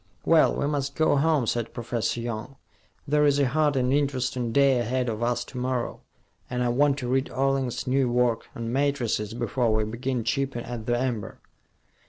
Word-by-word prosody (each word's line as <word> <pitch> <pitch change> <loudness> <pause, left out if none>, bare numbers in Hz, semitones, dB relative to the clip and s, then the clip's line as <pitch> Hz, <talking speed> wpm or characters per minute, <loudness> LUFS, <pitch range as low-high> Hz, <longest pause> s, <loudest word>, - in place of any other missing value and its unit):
"Well, 165 -2 +5
we - - -1
must 140 -1 -2
go 155 -2 +3
home," 150 -3 +2
said 115 0 -2
Professor 120 0 -2
Young. 115 +3 -5 0.5
"There's 145 -1 +3
a 140 - +3
hard 150 +2 +1
and 130 0 +1
interesting 130 -4 0
day 135 -1 +4
ahead 125 +2 -1
of 110 0 -4
us 120 0 0
to 125 - -8
morrow, 125 -1 -2 0.5
and 125 0 -1
I 120 - +1
want 140 +3 +3
to 125 - -4
read 130 +1 0
Orling's 135 -2 -1
new 130 -1 +1
work 120 -2 +1
on 115 0 -4
matrices 125 -6 0
before 120 0 0
we 110 0 +2
begin 120 +3 -3
chipping 135 +1 -1
at 115 -2 -6
the 120 0 +2
amber." 120 -4 -3
125 Hz, 180 wpm, -26 LUFS, 120-140 Hz, 0.5 s, Well